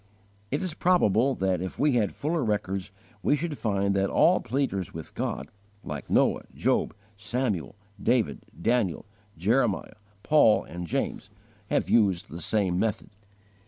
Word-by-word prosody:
It 145 Hz, +7 st, -1 dB
is 185 Hz, -4 st, -2 dB
probable 135 Hz, -, +3 dB
that 95 Hz, -2 st, 0 dB
if 95 Hz, -, -5 dB
we 145 Hz, +1 st, +3 dB
had 115 Hz, -5 st, +1 dB
fuller 155 Hz, +1 st, -1 dB
records 100 Hz, -3 st, -2 dB, 0.3 s
we 145 Hz, -, +3 dB
should 155 Hz, 0 st, -3 dB
find 100 Hz, -2 st, 0 dB
that 95 Hz, 0 st, +1 dB
all 180 Hz, +2 st, +4 dB
pleaders 120 Hz, -9 st, -2 dB
with 80 Hz, -1 st, -8 dB
God, -, -, -3 dB, 0.3 s
like -, -, -6 dB
Noah, -, -, +2 dB
Job, -, -, +1 dB, 0.2 s
Samuel, 110 Hz, -4 st, -2 dB, 0.3 s
David, 115 Hz, -, +1 dB, 0.2 s
Daniel, 110 Hz, -2 st, 0 dB, 0.3 s
Jeremiah, 110 Hz, +4 st, +1 dB, 0.3 s
Paul, 150 Hz, -8 st, +5 dB
and 85 Hz, +1 st, -7 dB
James, -, -, -2 dB, 0.4 s
have -, -, +1 dB
used 100 Hz, -4 st, +2 dB
the 85 Hz, +2 st, -6 dB
same 95 Hz, -1 st, +1 dB
method. 110 Hz, -2 st, -1 dB
105 Hz, 140 wpm, -27 LUFS, 95-135 Hz, 0.4 s, Paul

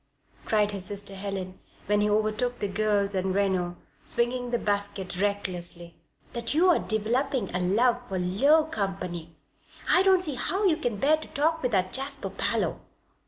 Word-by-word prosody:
cried 210 Hz, -1 st, +2 dB
his 195 Hz, -2 st, -3 dB
sister 200 Hz, -1 st, -2 dB
Helen, 190 Hz, -1 st, -5 dB, 0.3 s
when 210 Hz, +1 st, +2 dB
he 210 Hz, -, +2 dB
overtook 215 Hz, +4 st, 0 dB
the 205 Hz, -, -2 dB
girls 205 Hz, 0 st, 0 dB
and 190 Hz, 0 st, -1 dB
Reno, 185 Hz, -3 st, 0 dB, 0.3 s
swinging 245 Hz, +1 st, -1 dB
the 240 Hz, -, +1 dB
basket 200 Hz, -3 st, -2 dB
recklessly, 180 Hz, -4 st, -1 dB, 0.4 s
"that 235 Hz, +3 st, 0 dB
you 360 Hz, +4 st, +5 dB
are -, -, +3 dB
developing 235 Hz, -, -1 dB
a 180 Hz, -, 0 dB
love 230 Hz, +7 st, +2 dB
for 190 Hz, -, -2 dB
low 270 Hz, -, +3 dB
company. 185 Hz, -, -4 dB, 0.5 s
I 360 Hz, -, +5 dB
don't 380 Hz, -1 st, +4 dB
see 305 Hz, -5 st, -1 dB
how 370 Hz, +11 st, -1 dB
you 335 Hz, -5 st, +4 dB
can 245 Hz, -9 st, -2 dB
bear 295 Hz, +8 st, +3 dB
to 310 Hz, -, -10 dB
talk 320 Hz, +3 st, 0 dB
with 250 Hz, -, 0 dB
that 185 Hz, -1 st, +1 dB
Jasper 275 Hz, +1 st, -1 dB
Parloe." -, -, -1 dB
210 Hz, 165 wpm, -27 LUFS, 190-255 Hz, 0.5 s, you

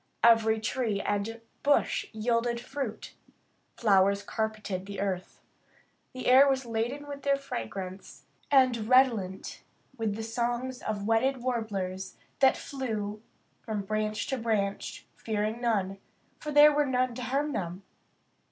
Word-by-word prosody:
Every 225 Hz, -1 st, +5 dB
tree 220 Hz, -2 st, -1 dB
and 210 Hz, +3 st, -2 dB, 0.2 s
bush 285 Hz, 0 st, +2 dB
yielded 235 Hz, +1 st, 0 dB
fruit. 255 Hz, -2 st, -5 dB, 0.6 s
Flowers 200 Hz, -2 st, +3 dB
carpeted 215 Hz, -3 st, -3 dB
the 200 Hz, -1 st, -6 dB
earth. 190 Hz, -2 st, -3 dB, 0.7 s
The 255 Hz, -, -6 dB
air 265 Hz, +3 st, +7 dB
was 265 Hz, -1 st, 0 dB
laden 235 Hz, +5 st, -2 dB
with 285 Hz, -1 st, -7 dB
their 280 Hz, 0 st, +3 dB
fragrance, 185 Hz, -, -6 dB, 0.2 s
and 255 Hz, -5 st, +3 dB
redolent 230 Hz, -8 st, +2 dB, 0.3 s
with 220 Hz, -4 st, -1 dB
the 225 Hz, -, -5 dB
songs 240 Hz, +2 st, -2 dB
of 205 Hz, -2 st, -3 dB
wedded 240 Hz, +3 st, +1 dB
warblers 200 Hz, -6 st, -3 dB, 0.2 s
that 265 Hz, -1 st, +5 dB
flew 215 Hz, -6 st, -4 dB, 0.4 s
from 215 Hz, -3 st, -3 dB
branch 215 Hz, +1 st, -1 dB
to 265 Hz, -2 st, -1 dB
branch, 210 Hz, -3 st, -2 dB
fearing 215 Hz, +1 st, -2 dB
none, 195 Hz, -5 st, 0 dB, 0.4 s
for 300 Hz, -, -5 dB
there 295 Hz, +1 st, +8 dB
were 295 Hz, 0 st, +2 dB
none 255 Hz, -1 st, +1 dB
to 250 Hz, -, -6 dB
harm 275 Hz, +5 st, -1 dB
them. 180 Hz, -4 st, -4 dB
225 Hz, 130 wpm, -29 LUFS, 205-255 Hz, 0.7 s, there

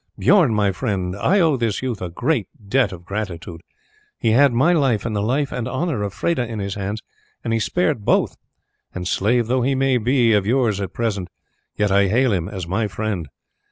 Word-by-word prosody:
Bijorn, 180 Hz, -, +4 dB
my 100 Hz, -2 st, +2 dB
friend, 95 Hz, -3 st, -2 dB
I 185 Hz, -, +2 dB
owe 160 Hz, -5 st, +3 dB
this 115 Hz, -1 st, -1 dB
youth 125 Hz, -5 st, -3 dB
a 90 Hz, -, -3 dB
deep 120 Hz, -, -1 dB, 0.2 s
debt 130 Hz, +3 st, +2 dB
of 90 Hz, -2 st, -10 dB
gratitude; 90 Hz, -5 st, -5 dB, 0.6 s
he 110 Hz, -, +1 dB
had 135 Hz, +4 st, +5 dB
my 135 Hz, +9 st, +3 dB
life 135 Hz, -10 st, +1 dB
and 110 Hz, -2 st, -2 dB
the 100 Hz, -, 0 dB
life 135 Hz, +6 st, 0 dB
and 125 Hz, -1 st, -3 dB
honour 135 Hz, -1 st, -2 dB
of 100 Hz, -1 st, -2 dB
Freda 125 Hz, -, -1 dB
in 115 Hz, -1 st, -5 dB
his 100 Hz, -1 st, -3 dB
hands, 100 Hz, +2 st, -4 dB, 0.4 s
and 115 Hz, -, -1 dB
he 115 Hz, -, +1 dB
spared 150 Hz, -2 st, 0 dB
both, -, -, +2 dB, 0.6 s
and, 90 Hz, -1 st, -4 dB
slave 115 Hz, +6 st, +1 dB
though 125 Hz, +3 st, +1 dB
he 135 Hz, +3 st, +1 dB
may 130 Hz, -1 st, +2 dB
be 120 Hz, 0 st, +3 dB
of 100 Hz, -2 st, +2 dB
yours 115 Hz, -5 st, +1 dB
at 95 Hz, -3 st, -4 dB
present, 105 Hz, -6 st, -2 dB, 0.5 s
yet 105 Hz, -1 st, +1 dB
I 100 Hz, 0 st, +4 dB
hail 120 Hz, +3 st, +2 dB
him 90 Hz, -1 st, -1 dB
as 95 Hz, -4 st, -5 dB
my 105 Hz, +5 st, 0 dB
friend. 100 Hz, -5 st, -3 dB
110 Hz, 205 wpm, -21 LUFS, 100-130 Hz, 0.6 s, had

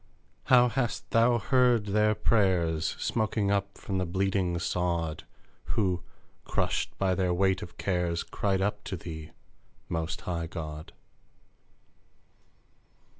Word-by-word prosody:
How 125 Hz, -1 st, +6 dB
hast 120 Hz, 0 st, -2 dB
Thou 120 Hz, +1 st, +4 dB
heard 120 Hz, -1 st, +3 dB
their 105 Hz, +1 st, +2 dB
prayers 90 Hz, -8 st, +2 dB
Smoking 110 Hz, -2 st, 0 dB
up 100 Hz, 0 st, -1 dB
from 95 Hz, -2 st, -3 dB
the 95 Hz, -, 0 dB
bleeding 95 Hz, -1 st, 0 dB
sod, 85 Hz, -2 st, -1 dB, 0.5 s
Who, 95 Hz, -6 st, +1 dB, 0.4 s
crushed -, -, -1 dB
by 95 Hz, -1 st, +2 dB
their 90 Hz, -1 st, +1 dB
weight 95 Hz, +1 st, +2 dB
of 85 Hz, -, -9 dB
cares, 90 Hz, -3 st, 0 dB
Cried 95 Hz, -2 st, -1 dB
up 105 Hz, +1 st, -1 dB
to 95 Hz, -, -4 dB
thee, 80 Hz, -2 st, -7 dB, 0.6 s
Most 80 Hz, 0 st, -3 dB
High 85 Hz, -2 st, -3 dB
God 80 Hz, -2 st, -7 dB
95 Hz, 120 wpm, -29 LUFS, 85-105 Hz, 0.6 s, How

